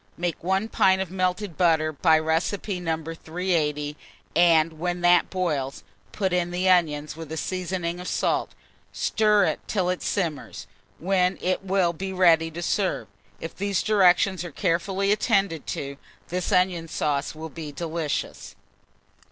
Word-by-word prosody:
Make 175 -2 -3
1 190 +4 0
pint 190 -3 +3
of 190 -2 -3
melted 185 -1 -2
butter, 160 -3 +3
by 160 +2 +4
recipe 170 +5 -1
No. 165 -2 -1
380, 160 -3 -2 0.4
and 165 -2 +4
when 175 +1 -2
that 175 0 +4
boils, 150 -8 -2 0.3
put 190 - -1
in 175 -1 +1
the 180 +1 -1
onions, 155 -5 +2
with 160 -1 -9
a 160 - -4
seasoning 180 0 -3
of 180 - -7
salt; - - -1 0.4
stir 210 -2 +2
it - - -1
till 185 -4 0
it 180 - -4
simmers, 165 -8 -3 0.3
when 185 +1 +1
it 185 +1 -1
will 190 -3 +1
be 190 +3 -5
ready 170 -3 +4
to 170 +2 -6
serve. 180 - -1 0.3
If 165 - -7
these 200 -2 -1
directions 190 -3 +3
are 175 - -6
carefully 190 +5 0
attended 195 -6 +1
to, 140 0 -4 0.3
this 180 +3 -2
onion 180 -3 +2
sauce 150 -2 -2
will 160 +1 -7
be 155 -1 -7
delicious. 160 0 -4
175 Hz, 150 wpm, -25 LUFS, 160-185 Hz, 0.4 s, by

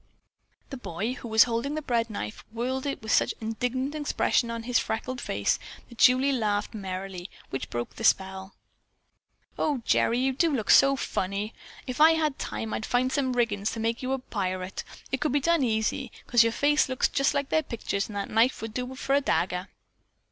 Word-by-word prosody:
The 270 - -5
boy, 220 +1 -3
who 255 - -8
was 220 0 +6
holding 240 +5 -2
the 310 - -2
bread 235 -3 0
knife, 105 - -6
whirled 255 +4 -2
with 255 -6 -3
such - - +3
an 220 - -6
indignant 255 +5 -2
expression 290 -5 +1
on 230 0 -4
his 245 0 +2
freckled 245 +3 -3
face - - 0 0.3
that 235 - -15
Julie 260 +2 +5
laughed 210 -5 0
merrily, 190 -2 -5 0.2
which 135 - -4
broke 120 0 -4
the - - -7
spell. 190 -2 +1 1.0
"Oh, 280 -6 0
Gerry, 235 - +3
you 265 +1 +1
do 325 +5 +2
look 220 -5 +1
so 275 0 +7
funny! 200 -3 -2 0.3
If 255 +3 -3
I 320 +1 +8
had 310 -4 0
time, 225 - -4
I'd - - -2
find 250 +3 +1
some 265 -2 0
riggins 220 -4 0
to 230 - -5
make 230 +1 -1
you 255 0 -2
into 265 -1 -2
a - - -40
pirate. 185 -3 -3 0.3
It 265 - -1
could 300 -3 0
be 290 - +3
done 335 +2 +2
easy, 220 -3 0
'cause 240 -2 +5
your 230 0 +4
face 295 +3 +2
looks 260 - +2
just 275 +1 +1
like 280 -1 -1
their 315 - +3
pictures 225 -7 -3
and 210 - -8
that 200 - -3
knife 230 +4 +3
would 225 -1 -5
do 250 +2 -4
for 270 +1 -1
a 285 - +4
dagger." 180 -7 0
240 Hz, 200 wpm, -27 LUFS, 215-265 Hz, 1.0 s, I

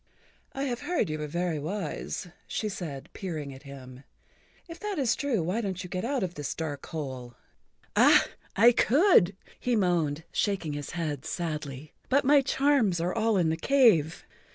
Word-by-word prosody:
"I 270 - -3
have 250 -3 -2
heard 350 -9 0
that 160 - -5
you 155 - -4
were 150 - -3
very 170 0 -1
wise," 170 +2 -4 0.2
she 215 - -2
said, 160 -9 -6
peering 155 -7 -5
at 135 - -12
him. 135 -2 -11 0.6
"If 335 -1 -9
that 415 -3 -4
is 255 -6 +2
true, 255 - 0
why 185 +8 -1
don't 190 -3 -3
you 180 - -9
get 185 - -2
out 260 0 -1
of 180 -2 -3
this 145 -4 -4
dark 145 -4 -5
hole?" 130 -6 -6 0.6
"Ah, - - +6 0.3
I 230 +5 +7
could," 245 - +4 0.2
he 250 -1 0
moaned, 165 -6 +1
shaking 190 -7 -1
his 145 -1 -6
head 150 -5 -3
sadly, 150 -4 -5 0.2
"but 275 +1 +3
my 285 +1 +6
charms 265 -9 +2
are 175 +2 -1
all 225 -2 +2
in 170 -3 +2
the 160 - 0
cave. 205 - +3
180 Hz, 175 wpm, -28 LUFS, 150-235 Hz, 0.6 s, I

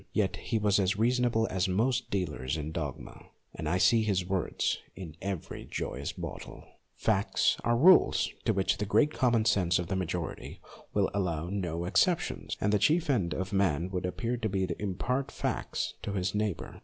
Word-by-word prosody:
Yet - - +1
he 115 - -2
was 105 -1 +2
as 95 +1 +1
reasonable 120 0 +2
as 95 0 +1
most 120 +7 0
dealers 75 -7 -2
in 75 0 -4
dogma, 75 -5 -6 0.3
and 75 - -4
I 90 - +2
see 115 +5 +4
his 100 -5 0
words 95 0 -1 0.2
in 85 -5 -8
every 95 -4 -5
joyous - - -4
bottle. - - -8 0.3
Facts - - +1
are 120 0 +2
rules 180 +8 +5
to - - +3
which 95 -1 0
the 105 - -2
great 150 +8 +3
common 120 -4 +2
sense 90 -6 +3
of 85 -1 -3
the 95 - 0
majority 90 -2 -4 0.3
will - - +1
allow 85 -4 -1
no 85 -4 -2
excep 170 - +3
tions, - - -5
and 105 +1 +1
the 105 - +4
chief 155 - +3
end 95 -10 0
of 95 +1 -4
man 95 -3 +1
would 90 -1 -2
appear 115 +6 -2
to 110 -2 -2
be 95 -1 0
to 85 +1 -5
impart 125 +8 -1
facts - - -3
to 100 - -4
his 95 -1 -1
neighbour. 105 -4 -3
95 Hz, 185 wpm, -30 LUFS, 90-115 Hz, 0.3 s, rules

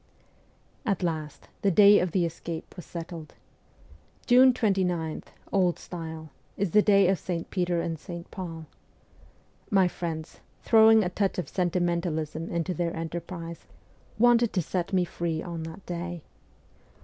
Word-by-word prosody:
At 200 -7 -1
last 155 -4 -3
the 200 - +3
day 205 +2 +7
of 180 - -1
the 180 -1 +2
escape 165 0 -6
was 180 - -10
settled. 165 -2 -8 0.9
June 255 +1 +7
29, 185 -9 0 0.3
old 180 -3 +2
style, 160 -3 -8 0.3
is 200 -3 -1
the 210 - +6
day 200 -2 +5
of 190 -2 +2
St. 170 0 -4
Peter 180 -2 0
and 165 -1 -3
St. 170 +1 -9
Paul. 165 -4 -6 1.0
My 195 -4 +4
friends, 165 -2 -5 0.2
throwing 220 -1 +6
a 180 - -1
touch 195 +1 -1
of 180 - -2
sentimentalism 170 -3 -1
into 170 +2 -1
their 170 0 -2
enterprise, 165 +1 -6 0.5
wanted 235 0 +4
to 185 - +1
set 180 +3 -3
me 185 -2 +2
free 170 -2 -3
on 170 -2 -5
that 165 +4 -12
day. 175 -1 -5
175 Hz, 140 wpm, -27 LUFS, 165-195 Hz, 1.0 s, day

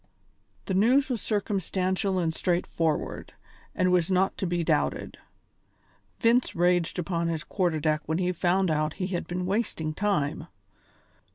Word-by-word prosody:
The 190 - -2
news 250 +9 +4
was 240 -5 -2
circumstantial 195 -2 -1
and 165 -3 0
straightforward, 165 -3 -1 0.4
and 185 0 +2
was 180 -1 +2
not 190 +1 +2
to 190 - -1
be 175 0 0
doubted. 70 - -1 1.0
Vince 235 +2 +3
raged 175 -1 +2
upon 170 -1 -1
his 165 -2 -2
quarter 175 -5 0
deck 155 0 +1
when 160 +1 0
he 180 0 +1
found 180 +1 +1
out 155 0 0
how - - -20
he 185 - -2
had 175 - -2
been 180 +1 -3
wasting 185 -6 -1
time. 160 -5 -1
180 Hz, 150 wpm, -27 LUFS, 165-195 Hz, 1.0 s, news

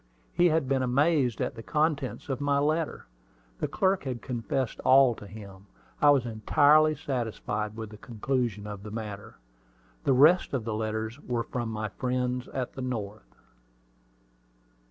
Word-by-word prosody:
He 175 - +4
had 155 -4 +1
been 135 -1 +1
amazed 130 -1 +2
at - - -1
the 115 - -9
contents 150 0 -1
of 135 -1 -3
my 145 0 +2
letter. 155 +3 0 0.5
The - - -1
clerk 190 0 +1
had 125 -3 -4
confessed 125 0 -2
all 130 -1 +6
to 105 - -11
him. 100 -2 -11 0.3
I 145 - +6
was 140 -4 +4
entirely 150 +7 +4
satisfied 110 -5 -3
with 110 -2 -6
the 105 - -10
conclusion 115 -2 -2
of 105 -2 -7
the 105 - -8
matter. 105 -2 -7 0.7
The 135 - +3
rest 150 +4 +5
of 125 - -2
the 115 - -2
letters 110 +3 -3
were 120 -3 -2
from 120 -1 -4
my 110 -1 -3
friends 125 +2 -2
at 130 -2 -4
the 135 - -7
North. 105 - -5
125 Hz, 155 wpm, -28 LUFS, 110-140 Hz, 0.7 s, all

